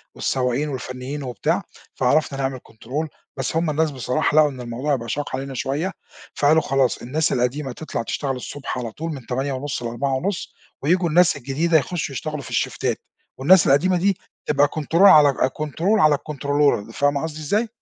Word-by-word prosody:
والسواقين 130 +3 0
والفنيين 130 +1 -5
وبتاع 125 -4 -1 0.3
فعرفنا 140 +2 +1
نعمل 135 -1 -2
control 135 +8 -4 0.3
بس 135 +3 -2
هُم 165 0 +1
الناس 155 +1 +1
بصراحة 130 +2 -1
لقوا 150 -1 +6
إن 130 -2 -8
الموضوع 125 +5 -1
بقى 115 -3 -6
شاق 145 +1 -2
علينا 135 0 -5
شوية، 145 +9 -2 0.4
فقالوا 155 +2 +4
خلاص 135 -3 +1
الناس 150 +6 0
القديمة 130 +2 -1
تطلع 155 -2 -4
تشتغل 135 +2 -2
الصبح 135 +2 -6
على 120 -2 -4
طول 165 +7 -5
من 130 -4 -9
08:30 135 +1 -3
ل16:30 135 - -2 0.3
وييجوا 175 +4 +2
الناس 175 +1 +4
الجديدة 145 +5 +1
يخشّوا 155 -1 -2
يشتغلوا 155 +2 -4
في 125 - -10
الشيفتات 120 - -1 0.4
والناس 165 +6 +5
القديمة 180 +7 +4
دي 190 +1 +1 0.3
تبقى 145 -1 +3
control 155 +2 -5
على 155 -7 +8
أج 130 - +3
control 155 +2 -6 0.2
على 155 -3 +5
الcontrol 145 -6 0
فاهمة 145 +2 +1
قصدي 155 -1 -5
إزاي؟ 205 +10 0
145 Hz, 165 wpm, -22 LUFS, 130-155 Hz, 0.4 s, على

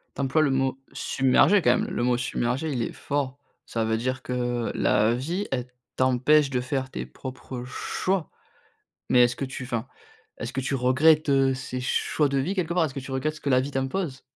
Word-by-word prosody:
Tu - - -6
emploies 140 +4 +2
le 145 - +3
mot 135 0 0
«submerger» 140 +9 +3
quand 125 +1 +4
même, - - -1
le - - -2
mot 125 0 +3
submerger 125 +4 -1
il 125 -3 -1
est - - -3
fort. 140 -1 -3 0.3
Ça 115 -1 -1
veut 110 0 +1
dire 130 +3 -2
que 120 -2 -2
la 110 +2 +3
vie, 170 +11 -2
elle 125 -2 -2 0.3
t'empêche 130 +3 +3
de 125 -2 0
faire 130 0 -3
tes - - -5
propres 130 -1 -8
choix. 180 +7 -2 0.8
Mais 125 - +6
est-ce 120 0 0
que - - -3
tu 130 0 -6
enfin, 120 -3 -3 0.5
est-ce 120 +3 -5
que 135 - -2
tu 135 +2 -2
regrettes, 145 +5 +4
heu, 135 -1 +3
ces 130 -1 -5
choix 145 +3 +1
de 140 0 0
vie 160 +9 -1
quelque 175 -3 -1
part? 175 -2 +3
Est-ce 135 - -3
que 135 - -4
tu 135 - -9
regrettes 140 +4 -1
ce - - -12
que 140 - -2
la 130 -1 +5
vie 140 +2 -3
t'impose? 135 +2 -2
130 Hz, 215 wpm, -26 LUFS, 125-145 Hz, 0.8 s, Mais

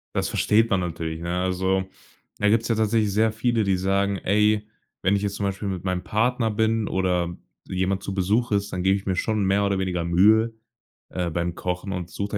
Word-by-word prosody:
Das - - 0
versteht 115 +2 +2
man 95 - +2
natürlich, 80 -2 -4
ne? 85 +2 -2
Also, 95 +1 0 0.6
da 105 - +2
gibt's 115 +2 +2
ja 115 - +2
tatsächlich 110 -1 +1
sehr 110 +2 +2
viele, 115 -1 +1
die 95 -1 +2
sagen: 100 +1 0
„Ey, 105 +3 +2 0.4
wenn 95 - +2
ich 100 - -3
jetzt 100 -1 -2
zum 100 - -2
Beispiel 100 +1 -3
mit 95 -2 -4
meinem 90 -1 -2
Partner 115 +1 +1
bin 110 0 +1
oder 90 -2 0 0.3
jemand 95 +1 -1
zu 100 - -5
Besuch 105 +6 +1
ist, 100 0 0
dann 90 - -3
gebe 95 +1 +3
ich 100 - -5
mir 95 -2 -1
schon 110 0 0
mehr 100 +1 +2
oder 100 -1 +1
weniger 90 -3 -1
Mühe, 110 +7 +4 0.6
äh, 90 -2 -2
beim 85 +1 -2
Kochen 90 +2 -3
und 90 -2 -4
suche 100 +4 -3
100 Hz, 210 wpm, -24 LUFS, 90-105 Hz, 0.6 s, Mühe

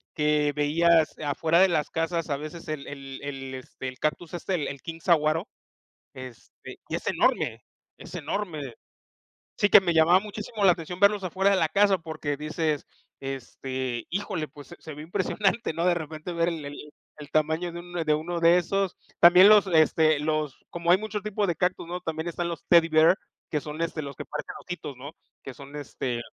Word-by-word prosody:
que 150 -1 +2
veías 160 +2 +3
afuera 160 +3 +1
de 190 - +7
las 160 -4 0
casas 165 0 -2
a 140 - 0
veces 155 +3 -8
el 155 -2 -5
el 135 -1 -8
el, 135 -2 -6
este, 130 0 -8
el 130 -1 -7
cactus 160 +2 -2
este, 175 -3 -2
el 140 -1 -8
king 165 0 -7
saguaro, 165 +1 +2 0.7
este, 130 -3 -11
y - - -4
es - - -8
enorme, - - +1 0.4
es - - -11
enorme. 150 - -4 0.8
Sí 205 - +3
que - - +9
me 175 -3 0
llamaba 170 +4 +5
muchísimo 210 0 -5
la 180 - +8
atención 175 +1 -7
verlos 200 -1 +4
afuera 190 +2 +1
de 195 - +3
la 160 -3 +1
casa 200 +1 +4
porque 155 -3 -4
dices, 155 0 -2 0.3
este: 130 -2 -4
"Híjole, 185 -4 -3
pues 145 +1 -13
se 175 - -11
se 155 - -9
ve 150 - -10
impresionante", 195 +5 0
¿no? 165 +2 -1
De 180 - +4
repente 160 +1 -6
ver 170 0 +1
el 150 -2 -6 0.3
el 145 -1 -10
tamaño 160 +3 0
de 170 - -6
un 175 0 -12
de 155 - +3
uno 170 +3 -3
de 170 +1 +6
esos. 195 +2 -1 0.2
También 180 +3 +8
los, 210 -2 +7
este, 155 -2 +4
los 155 -2 -1
como 170 0 -2
hay 185 - +7
muchos 210 -1 -4
tipos 210 -1 -1
de 170 - 0
cactus, 180 -1 -1
¿no? 180 +1 -4
También 160 -1 -4
están 170 0 -3
los 170 - -7
Teddy 170 -1 +6
Bear, 160 +3 +5 0.3
que 150 - 0
son, 150 +1 -7
este, 165 -1 -2
los 140 -1 -7
que - - -8
parecen - - -6
ositos, 165 -5 -7
¿no? 140 +4 -8 0.3
Que 135 - -8
son, 140 +2 -12
este, 130 -4 -4
160 Hz, 195 wpm, -26 LUFS, 150-180 Hz, 0.8 s, que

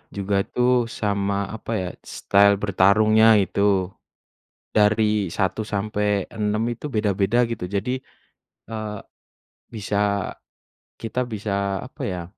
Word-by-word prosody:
juga 100 0 0
tuh 125 -1 +2
sama 100 -2 -1
apa 110 +1 -7
ya, 95 -4 -2 0.2
style 100 0 +3
bertarungnya 105 +3 +4
itu, 95 0 +1 0.8
dari 105 -1 +3
1-6 105 +1 -1
itu 120 +5 -6
beda-beda 105 +2 +1
gitu, 115 -5 -5
jadi, 105 +6 -2 0.7
eee, 110 -2 -5 0.8
bisa 100 -1 -2 1.0
kita 115 +3 -2
bisa 100 -3 -2
apa 130 - -10
ya, 90 -3 -3
105 Hz, 95 wpm, -23 LUFS, 100-110 Hz, 1.0 s, bertarungnya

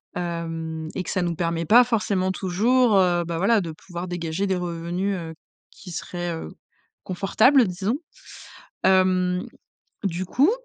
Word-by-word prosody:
Hem, 165 -2 -4
et 185 - -2
que - - -7
ça 185 - 0
nous 170 -1 -1
permet 165 0 -1
pas 240 +8 +7
forcément 200 -5 0
toujours, 215 +5 +2
heu, 175 -2 +3
ben 165 0 -3
voila, 200 +4 +3
de 165 - -5
pouvoir 175 +3 -7
dégager 175 +2 -2
des 190 - +1
revenus, 175 +2 -2
heu, 165 -2 -6 0.4
qui 185 - -12
seraient, 175 0 -4
heu, 120 - -6 0.5
confortables 215 +7 +3
disons. 190 +8 -1 0.9
Hem, 185 -1 +3 0.6
du 185 -1 -1
coup, 275 - +3
180 Hz, 145 wpm, -24 LUFS, 170-195 Hz, 0.9 s, pas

